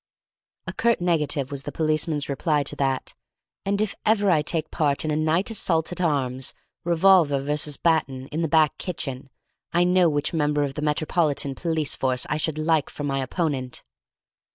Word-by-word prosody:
A - - -5
curt 235 0 +2
negative 155 -5 0
was 140 -1 -4
the 145 - -6
policeman's 155 -1 0
reply 145 +1 0
to 140 - -3
that; 135 -1 -1 0.5
and 200 0 0
if 215 -1 0
ever 205 -3 +3
I 155 -3 +4
take 155 +1 -2
part 145 -2 0
in 155 - 0
a - - +1
night 160 +7 +1
assault 165 -7 +1
at 180 - -5
arms, 130 -6 -1 0.3
revolver 170 -4 +4
versus 145 +1 -1
baton, 140 -6 0
in 155 +2 -2
the 165 - +1
back 155 -1 +3
kitchen, 135 -7 -5 0.4
I 175 +1 +3
know 180 -1 +4
which 145 +1 -1
member 150 -2 +1
of 140 -1 -2
the 150 - -5
Metropolitan 150 -1 0
Police 160 -1 -1
Force 130 -1 0
I 155 - +1
should 155 0 -2
like 155 -1 +1
for 145 - -7
my 135 -1 -1
opponent. 130 -3 -2
155 Hz, 175 wpm, -24 LUFS, 140-170 Hz, 0.5 s, I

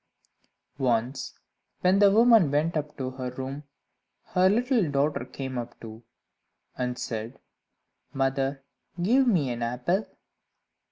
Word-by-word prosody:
Once, 125 0 -1 0.4
when 185 +2 +4
the 205 -1 +7
woman 225 - +6
went 150 +4 0
up 150 -1 -3
to 130 -2 -3
her 130 -1 -5
room, 130 +3 -6 0.7
her 185 +1 +4
little 235 - +2
daughter 140 -1 0
came 130 -1 -5
up 120 - -8
too, 110 0 -10 0.7
and 125 0 -3
said 115 +2 -5 0.7
"Mother, 135 0 -1 0.4
give 250 +9 +3
me 160 - +2
an 120 0 -5
apple." 125 - -1
140 Hz, 120 wpm, -27 LUFS, 125-185 Hz, 0.7 s, the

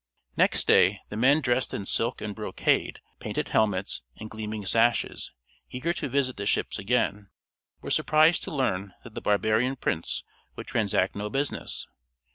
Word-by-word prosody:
Next - - +2
day, 100 +1 +5
the - - -6
men 135 +7 +4
dressed 125 -1 0
in 100 - -4
silk 115 +4 0
and 105 -1 -4
brocade, 105 +1 0 0.2
painted - - -3
helmets, 100 - +1 0.2
and 110 0 -8
gleaming 110 -1 -5
sashes, 115 +4 +1 0.4
eager 145 +7 -2
to 150 -6 -4
visit 130 -1 0
the 100 -1 -3
ships - - 0
again, 105 -1 0 0.5
were - - -5
surprised 155 +2 +4
to - - -6
learn 100 - -1
that 115 - -12
the - - -6
barbarian 110 +5 +2
prince 85 -10 -2 0.3
would - - -7
transact 100 -3 0
no 105 +1 -3
business. 140 +5 -3
110 Hz, 155 wpm, -27 LUFS, 105-130 Hz, 0.5 s, day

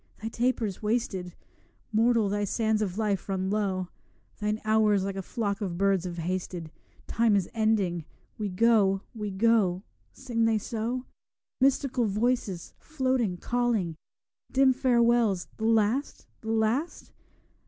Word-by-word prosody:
'Thy 220 - -4
taper's 230 -4 -1
wasted; 210 -5 -2 0.6
Mortal, 225 0 +3
thy 205 +1 -1
sands 220 +1 0
of 195 -2 -2
life 205 -3 -1
run 190 0 -1
low; 190 -3 -1 0.5
Thine 210 0 -1
hours 215 -2 +3
like 195 0 -3
a 195 - -3
flock 200 +1 -3
of 180 -4 -3
birds 195 -1 +2
have 175 -1 -5
hasted: 175 -1 -4 0.3
Time 225 -2 +2
is 195 -3 +1
ending; 205 -7 +1 0.3
we 210 -2 -3
go, 195 -1 +3
we 210 -2 -4
go.' 195 -2 +2 0.3
Sing 235 -3 -1
they 225 -1 +3
so? 235 +4 -3 0.5
Mystical 260 -2 +2
voices, 210 -4 -1
floating, 260 - -1
calling; 230 -7 0 0.6
Dim 265 0 +4
farewells 235 -6 +2
the 220 - -3
last, 225 +5 +1
the 220 - -7
last? 225 +8 -1
215 Hz, 130 wpm, -28 LUFS, 195-235 Hz, 0.6 s, Dim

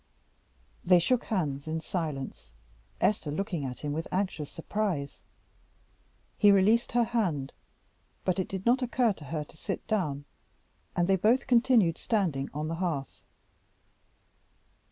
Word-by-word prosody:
They 180 0 +6
shook 235 +8 +2
hands 150 -8 -2
in 160 +1 -1
silence, 145 - -4 0.5
Esther 200 -7 +1
looking 170 -1 -2
at 125 -1 -6
him 145 -1 -2
with 160 +2 -3
anxious 180 -6 -1
surprise. 170 -5 -3 1.2
He 205 - +7
released 210 +5 +4
her 240 0 +4
hand, 175 - -1 0.7
but 185 0 +1
it 185 - -1
did 190 0 -5
not 250 +3 +4
occur 245 -2 +2
to 155 - -12
her 150 +2 -3
to 150 - -18
sit 195 +4 -4
down, 150 -10 -1 0.7
and 175 0 +2
they 190 0 +4
both 230 +8 +3
continued 235 -9 +4
standing 170 - 0
on 150 +2 -3
the 165 - -2
hearth. 150 -7 -3
180 Hz, 135 wpm, -29 LUFS, 150-215 Hz, 1.2 s, He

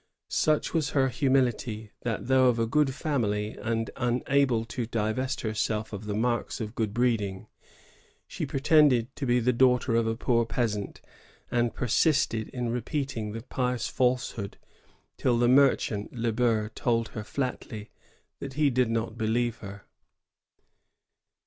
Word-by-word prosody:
Such 155 -1 +1
was 155 -4 +1
her 135 -1 +4
humility 120 -5 0
that, 115 -3 -3
though 130 0 +4
of 120 -2 +3
a 115 - +1
good 145 +4 +2
family 110 -8 -1
and 115 0 -2
unable 120 0 +1
to 115 0 -4
divest 115 +4 -1
herself 110 0 -2
of 100 +1 -6
the 105 - -2
marks 120 +2 -1
of 110 -1 -5
good 110 -4 -1
breeding, 105 -5 0 0.8
she - - -4
pretended 135 -3 +3
to 140 - -3
be 120 0 +3
the 125 +2 +2
daughter 125 -1 +3
of 115 -1 +2
a 115 - 0
poor 115 -2 +2
peasant, 110 -3 -2 0.5
and 120 -1 +1
persisted 125 -2 +1
in 125 -2 -3
repeating 120 -3 -3
the 115 0 -6
pious 125 -2 -2
falsehood 125 -5 -1 0.6
till 120 -2 +2
the 120 0 +3
merchant 125 -5 +3
Le 120 -1 -1
Ber 110 -2 +1
told 115 0 -1
her 110 - -6
flatly 110 -2 -4 0.5
that 135 -1 -6
he 145 0 +2
did 125 -1 +2
not 115 0 -2
believe 115 +1 0
her. 100 -1 -10
120 Hz, 145 wpm, -27 LUFS, 110-130 Hz, 0.8 s, her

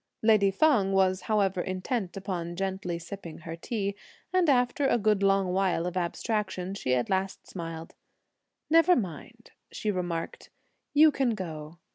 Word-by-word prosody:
Lady 215 -3 +5
Feng 200 -3 +3
was 190 -1 +3
however 195 -4 +2
intent 185 +2 -3
upon 175 -3 -4
gently 190 -2 -3
sipping 170 -1 -8
her 165 0 -7
tea, 200 +3 -3 0.4
and 365 -3 +3
after 255 +1 +2
a 240 - +3
good 210 -2 +2
long 195 -2 +2
while 185 -3 +1
of 180 0 -4
abstraction, 190 +1 -2
she 130 -10 0
at 125 - 0
last 190 0 -2
smiled: 165 -2 -7 0.7
"Never 330 +3 +5
mind," 230 - -6 0.2
she 215 - -2
remarked; 175 -3 -4 0.5
"you 310 +1 +7
can 265 -5 0
go. 160 -4 -7
195 Hz, 145 wpm, -28 LUFS, 175-215 Hz, 0.7 s, you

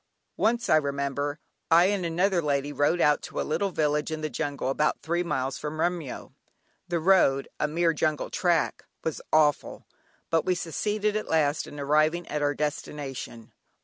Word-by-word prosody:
Once, 235 +2 +1
I 155 -4 +5
remember, 140 0 -2 0.3
I 170 +2 +6
and 195 -3 -2
another 175 +2 +1
lady 145 -1 -1
rode 145 +5 +2
out 150 0 +4
to - - -6
a - - +1
little 165 +6 -1
village 150 -3 0
in 155 -1 -4
the 155 -1 -3
jungle 145 -4 -2
about 150 +3 0
three 170 +2 0
miles 135 -6 -2
from 150 +1 -5
Remyo. 170 -5 -2 0.5
The 175 -1 -1
road, 160 -6 +4
a 150 - +1
mere 165 +2 +1
jungle 155 -1 -1
track, 170 -5 +1 0.2
was 160 - -3
awful, 150 -2 +2 0.5
but 165 -1 +3
we 185 - +1
succeeded 210 +5 -1
at 215 - -3
last 150 -2 +1
in 145 - -9
arriving 155 +4 +2
at 150 - -2
our 145 -1 +1
destination. 140 -5 -5
155 Hz, 170 wpm, -27 LUFS, 145-175 Hz, 0.5 s, I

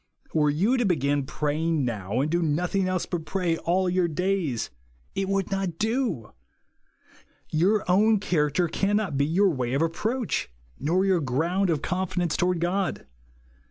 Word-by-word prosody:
Were 150 -2 +3
you 195 - +2
to 245 - +2
begin 140 -5 +1
praying 155 0 0
now, 110 0 -2
and 150 +2 -1
do 175 +1 +1
nothing 175 +5 0
else 185 -1 -1
but 175 -3 -3
pray 175 -1 -1
all 185 +3 +1
your 180 0 +2
days, 170 - -1 0.4
it 195 0 -2
would 195 -1 0
not 195 -4 -2
do! 220 - -1 1.2
Your 195 +7 +2
own 210 +4 +4
character 170 -2 +1
cannot 200 -1 0
be 140 +1 +2
your 190 +4 +3
way 125 -4 -2
of 145 - +2
approach, 220 +9 -1 0.3
nor 175 +7 +1
your 185 -3 +2
ground 165 +9 0
of 155 -4 0
confidence 180 -2 -1
toward 180 -1 +1
God. 180 - -1
175 Hz, 155 wpm, -26 LUFS, 150-195 Hz, 1.2 s, own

